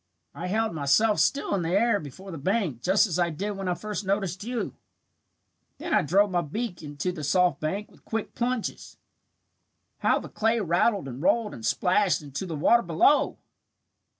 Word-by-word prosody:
I 180 - -5
held 220 +2 0
myself 165 +9 +2
still 280 - +1
in 195 - +1
the 165 - -2
air 230 -3 +2
before 170 +7 -10
the 165 - -6
bank 180 - -1
just 190 - +4
as 180 -4 -2
I 175 -1 +2
did 195 +6 -3
when 195 -2 -5
I 180 - +1
first 210 +2 -5
noticed 195 -1 -1
you. 240 +1 -3 1.0
Then 330 +2 -4
I - - +5
drove 195 +6 +3
my 175 -1 +1
beak 175 +4 -4
into 145 +3 -3
the 165 -4 -7
soft 175 0 +2
bank 195 +7 -3
with - - -22
quick 225 -1 -4
plunges. 245 -1 -3 1.0
How - - +3
the - - -6
clay 225 +2 +1
rattled 190 0 +1
and 130 +1 -7
rolled 220 +5 +2
and 115 - -10
splashed 185 - +2
into 145 +6 -5
the 165 - -4
water 235 +11 +4
below! 175 - +3
190 Hz, 180 wpm, -26 LUFS, 165-215 Hz, 1.0 s, I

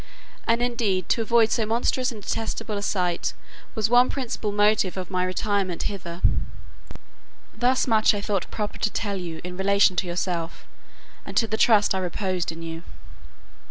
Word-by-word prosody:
And 230 +1 +2
indeed 220 -7 0
to 235 - +2
avoid 225 0 +3
so 230 - +1
monstrous 240 +3 0
and 215 -3 -9
detestable 225 0 -3
a 200 - -3
sight 180 -4 0 0.4
was 220 -2 +1
one 245 +2 +5
principal 235 -5 -3
motive 205 -2 +2
of 185 0 -5
my 180 -1 +1
retirement 185 -1 -1
hither. 175 -3 -5 1.3
Thus 250 +3 +2
much 220 -3 +4
I - - -2
thought 200 -3 -2
proper 210 -1 -4
to - - +1
tell 205 -2 -2
you 170 -3 -6
in 180 0 -6
relation 200 -1 +4
to 185 - 0
yourself, 175 -1 -3 0.6
and - - -6
to 230 - +4
the 220 0 -2
trust 220 -2 +4
I 190 - 0
reposed 185 -1 -2
in 165 +1 -9
you. 165 0 -6
205 Hz, 165 wpm, -25 LUFS, 185-225 Hz, 1.3 s, one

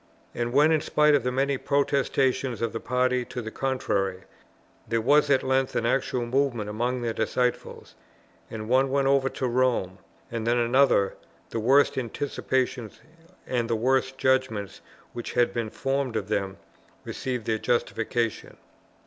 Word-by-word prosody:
And 120 0 -2
when 145 +5 +4
in 155 -2 +3
spite 150 0 +3
of 145 - +4
the 125 +1 -1
many 135 +1 0
protestations 135 -3 0
of 115 - -1
the 115 - -3
party 125 +1 0
to 125 - -6
the 110 -2 -6
contrary, 100 -9 -1 0.6
there 115 +1 0
was 145 +6 +3
at 135 -2 +3
length 130 0 0
an 115 - 0
actual 125 0 0
movement 120 -4 0
among 120 +3 -2
their 115 -1 -1
disciples, 125 +3 -2 0.6
and 110 -1 -6
one 130 +3 +3
went 135 0 +1
over 135 -1 +3
to 130 - -3
Rome, 120 -7 0 0.3
and 115 -1 -3
then 120 +1 +3
another, 120 -4 +3 0.4
the 115 - -2
worst 135 +4 +3
anticipations 125 -2 -2 0.5
and 120 -2 -1
the 115 - +1
worst 130 +3 +1
judgments 130 -7 0 0.3
which 120 - -6
had 120 -1 +2
been 115 -2 -2
formed 135 0 -2
of 105 -2 -3
them 95 -1 -2 0.5
received 125 -4 -4
their 110 -1 0
justification. 115 -1 -2
125 Hz, 155 wpm, -26 LUFS, 115-135 Hz, 0.6 s, when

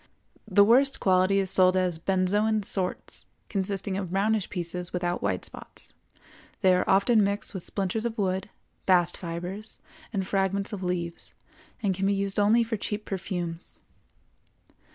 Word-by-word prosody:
The 200 0 +6
worst 265 +6 +4
quality 185 +1 +3
is 190 -1 +1
sold 185 0 +5
as 180 -3 0
"benzoin 205 +4 +1
sorts," 190 -2 -2 0.2
consisting 195 -1 -2
of 190 -3 -3
brownish 200 +2 +1
pieces 180 -1 -3
without 175 -1 -2
white 95 -3 0
spots; - - -8 0.7
they 185 -1 +5
are 180 - +1
often 205 +3 +4
mixed 200 +2 -1
with 190 - -3
splinters 195 +4 -2
of 235 -1 -3
wood, 190 -1 -1 0.4
bast 175 -2 +4
fibres, 180 +5 -6 0.3
and 195 -4 -2
fragments 195 +1 0
of 200 - -4
leaves, 175 -2 -4 0.5
and 195 -2 +2
can 195 +1 -1
be 200 - +2
used 195 0 0
only 220 +3 +4
for 225 -1 -3
cheap 210 +1 -4
perfumes. 175 -3 -4
195 Hz, 150 wpm, -27 LUFS, 180-205 Hz, 0.7 s, The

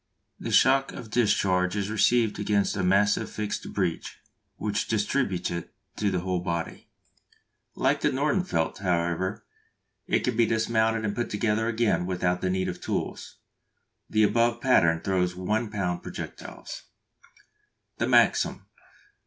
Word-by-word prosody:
The - - -5
shock 135 +1 +4
of 115 -4 -9
discharge 100 -5 +2
is 100 0 -2
received 110 +1 +2
against 100 -1 +1
a 95 - -1
massive 100 +3 +2
fixed 105 -1 -4
breech, 90 -5 -2 0.4
which 105 -1 -2
distributes 105 -4 0
it 85 -1 -6 0.2
to 105 - +1
the 90 -2 -1
whole 90 0 -1
body. 85 -2 -4 0.9
Like - - +1
the - - +3
Nordenfelt, 150 - 0
however, 90 +1 -1 0.6
it - - +2
can 125 - -1
be 115 0 +3
dismounted 110 0 +1
and 105 -1 -2
put 120 - -2
together 110 +1 0
again 115 -6 +1
without 90 -1 0
the 95 - 0
need 95 0 0
of - - -5
tools. - - -4 0.7
The 110 0 +3
above 115 +2 +2
pattern 85 -10 +3
throws 90 -2 0
1 105 +5 -1
lb. 90 -4 -2
projectiles. - - -8 1.2
_The - - 0
Maxim. - - +3
105 Hz, 135 wpm, -26 LUFS, 90-115 Hz, 1.2 s, shock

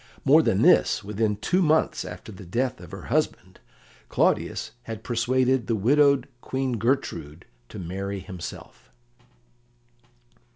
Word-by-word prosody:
More - - +7
than - - +1
this: - - +4
within 105 +1 -1
two 175 - 0
months 160 -1 +2
after 90 +4 -9
the 95 0 -11
death 120 +7 -2
of 90 - -11
her 95 -1 -9
husband, 115 -10 -2 0.5
Claudius - - 0
had 110 -1 -7
persuaded 125 +1 +1
the 115 - +1
widowed 140 +4 +3
Queen 130 -3 -2
Gertrude 95 - -2 0.2
to - - -9
marry 95 +3 -4
himself. 90 -2 -9
115 Hz, 125 wpm, -25 LUFS, 95-130 Hz, 0.5 s, More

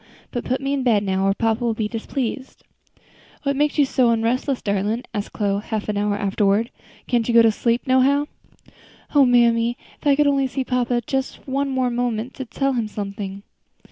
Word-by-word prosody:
But 240 - -4
put 255 +2 -1
me 275 +1 -1
in 280 - 0
bed 225 -5 +2
now, 190 0 0
or 195 - +2
papa 225 +1 0
will 230 -2 0
be 220 -1 -1
displeased." 245 +3 -4 0.8
"What 280 -1 0
makes 295 +2 +1
you 290 - +5
so 260 -2 +2
onrestless, 235 +4 0
darlin'?" 205 +4 -1
asked 205 -2 -4
Chloe, 200 -1 0
half 215 -1 -4
an 210 - -1
hour 205 0 0
afterward; 205 +2 +1 0.3
"can't 240 -2 0
you 240 - +1
go 230 - +8
to 225 - +5
sleep 235 +2 0
no 260 0 +4
how?" 280 +3 +3 0.9
"O 280 -3 +6
mammy! 235 0 +3 0.2
if - - -3
I 280 - +5
could 295 +1 +3
only 275 -1 +2
see 260 +1 -3
papa 245 -1 0
just 265 -1 -2
for 265 - -12
one 275 0 -1 0.2
moment 240 0 -2
to 265 - -6
tell 275 +3 -1
him 235 -3 -1
something. 200 -1 -6
240 Hz, 200 wpm, -22 LUFS, 215-265 Hz, 0.9 s, go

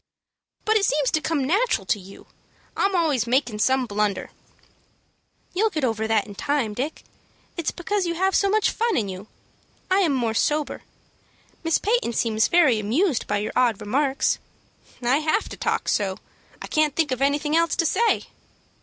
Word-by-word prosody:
"But 440 0 +4
it 400 - +2
seems 290 -5 +1
to 315 - +1
come 300 -4 -1
natural 415 - +1
to 210 - 0
you. 190 +1 -13 0.5
I'm 390 -1 +1
always 295 -9 +1
makin' 240 -3 0
some 260 +3 +2
blunder." 210 -2 -2 1.2
"You'll 435 +5 +2
get 315 -8 -3
over 220 -3 0
that 220 -2 +2
in 205 - -10
time, 265 -1 -1
Dick. 270 +8 -4 0.5
It's 335 -3 -1
because 375 +1 -2
you 340 - -2
have 380 +3 +1
so 400 - +3
much 430 +1 +2
fun 465 -2 0
in 210 -5 -1
you. 190 +2 -8 0.6
I 380 - +4
am 340 -7 +2
more 235 -3 0
sober. 295 +6 0 0.8
Miss 330 -1 +2
Peyton 440 - 0
seems 220 -1 +1
very 305 -9 +4
much - - -2
amused 265 - 0
by 205 - 0
your 210 +1 -3
odd 235 -5 +2
remarks." 270 +6 0 0.6
"I 250 +3 +3
have 310 +6 0
to - - -7
talk - - -2
so; 190 -2 0 0.4
I - - -7
can't 305 -2 +1
think 315 -4 +1
of 255 0 -2
anything 290 +2 +1
else 335 0 +2
to 335 - +1
say." 460 +8 +2
285 Hz, 180 wpm, -24 LUFS, 225-340 Hz, 1.2 s, But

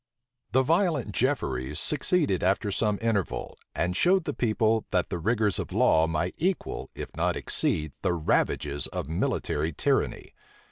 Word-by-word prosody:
The 130 +1 +4
violent 160 - +1
Jefferies 75 - -1
succeeded 150 - +1
after 100 +3 +1
some 105 0 0
interval; 110 -6 -1 0.2
and 90 +1 0
showed 180 - +3
the 145 - -2
people, 110 -2 +1
that 90 - 0
the 85 - -2
rigors 105 -1 +1
of - - -4
law 80 0 +4
might 80 +2 -1
equal, 185 +3 -2
if - - -7
not - - 0
exceed, 75 -1 0
the 90 - +1
ravages 75 -3 +1
of - - -5
military 80 -1 -1
tyranny. - - -1
100 Hz, 145 wpm, -27 LUFS, 80-130 Hz, 0.2 s, The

